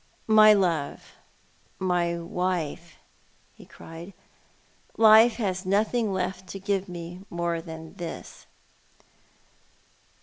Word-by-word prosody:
" - - -36
:\Iy 215 -1 +7
love, 165 -6 -2 0.7
my 175 -2 0
wife," 170 -1 -3 0.6
he - - -16
cried. 165 +4 -11 0.5
" - - -36
Life 225 +1 +7
has 190 -5 -2
nothing 215 +3 +1
left 185 0 -3
to 195 - -7
give 195 -1 -2
me 175 +1 -8
more 170 -1 -2
than 160 -1 -10
this." 170 -2 -8
180 Hz, 105 wpm, -26 LUFS, 170-200 Hz, 0.7 s, Iy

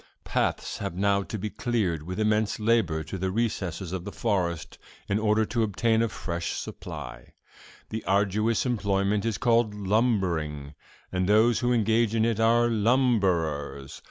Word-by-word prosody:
Paths - - -1
have 85 - -4
now 100 +1 +2
to 110 - -5
be 105 +1 -4
cleared 105 -10 -1
with 90 +6 -6
immense 105 0 +1
labor 105 -8 +1
to 95 +4 -6
the 95 +1 -1
recesses 95 -5 -2
of 95 -2 -3
the - - -6
forest, 90 -7 -2 0.3
in 100 +1 +1
order 110 0 +2
to 115 +2 -1
obtain 110 +1 +1
a 115 - +1
fresh 85 -4 -4
supply. - - -8 0.6
This 110 - -4
arduous 105 +4 +1
employment 100 -3 0
is 115 -3 -1
called 115 -3 +2
"lumbering," 95 - 0 0.4
and 90 +1 0
those 110 +2 +4
who 120 0 +1
engage 115 -1 +2
in 110 0 +3
it 115 -2 0
are 115 +1 +4
"lumberers." 95 - 0
105 Hz, 155 wpm, -27 LUFS, 90-115 Hz, 0.6 s, those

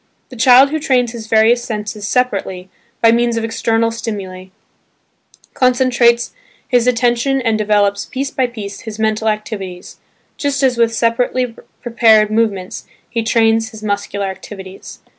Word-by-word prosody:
The 255 - -11
child 255 +3 +6
who 315 - -1
trains 255 -6 +1
his 230 -2 -8
various 225 +2 +3
senses 210 -2 -5
separately, 195 -7 -2 0.3
by 230 - +7
means 235 0 +1
of 225 - -2
external 225 0 0
stimuli, 200 -5 -6 1.1
concentrates 245 -2 +2 0.3
his 245 -1 +2
attention 245 +2 +1
and 225 -3 0
develops, 205 -1 +1
piece 270 +1 -4
by 260 -2 0
piece, 205 -4 -8
his 220 -2 -8
mental 220 0 0
activities, 200 -4 -6 0.4
just 285 -1 -1
as 260 -2 +3
with 230 -1 +2
separately 230 +2 0 0.3
prepared 220 -3 +4
movements 215 -4 -2 0.2
he 230 -1 -1
trains 225 0 +2
his 220 -2 -12
muscular 200 -1 -2
activities. 190 0 -9
225 Hz, 140 wpm, -16 LUFS, 210-245 Hz, 1.1 s, by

